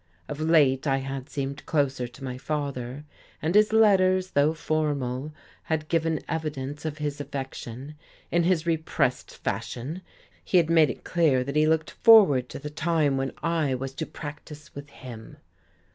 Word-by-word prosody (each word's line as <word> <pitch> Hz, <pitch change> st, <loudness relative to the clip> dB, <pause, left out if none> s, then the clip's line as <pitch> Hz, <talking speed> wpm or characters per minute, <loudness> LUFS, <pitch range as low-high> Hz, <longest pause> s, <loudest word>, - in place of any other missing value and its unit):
Of 145 Hz, -, -6 dB
late 150 Hz, -4 st, +3 dB
I 135 Hz, -1 st, +2 dB
had 135 Hz, 0 st, -5 dB
seemed 140 Hz, 0 st, -4 dB
closer 135 Hz, -5 st, 0 dB
to 125 Hz, +3 st, -14 dB
my 130 Hz, -1 st, -4 dB
father, 140 Hz, -1 st, -4 dB, 0.3 s
and 160 Hz, +3 st, -1 dB
his 210 Hz, +1 st, +5 dB
letters, 185 Hz, -4 st, +4 dB
though 145 Hz, +3 st, +2 dB
formal, 150 Hz, -3 st, -2 dB, 0.3 s
had 155 Hz, -1 st, -2 dB
given 165 Hz, -1 st, +1 dB
evidence 150 Hz, -2 st, -4 dB
of 150 Hz, -1 st, -3 dB
his 145 Hz, -1 st, -3 dB
affection; 135 Hz, -1 st, -6 dB, 0.4 s
in 175 Hz, -, +3 dB
his 170 Hz, -1 st, +1 dB
repressed 160 Hz, -1 st, 0 dB
fashion 145 Hz, +10 st, -4 dB, 0.4 s
he 185 Hz, -, +2 dB
had 165 Hz, -2 st, +3 dB
made 160 Hz, -3 st, +5 dB
it -, -, -6 dB
clear 155 Hz, -8 st, +2 dB
that 140 Hz, +2 st, -5 dB
he 155 Hz, 0 st, +4 dB
looked 160 Hz, 0 st, +1 dB
forward 195 Hz, -, +6 dB
to -, -, -7 dB
the 150 Hz, +1 st, -7 dB
time 155 Hz, -2 st, +1 dB
when 135 Hz, 0 st, -1 dB
I 160 Hz, -5 st, +1 dB
was 135 Hz, +1 st, -5 dB
to 160 Hz, +3 st, -4 dB
practise 150 Hz, 0 st, -9 dB
with 140 Hz, 0 st, -9 dB
him. 120 Hz, -5 st, -11 dB
150 Hz, 160 wpm, -26 LUFS, 135-160 Hz, 0.4 s, forward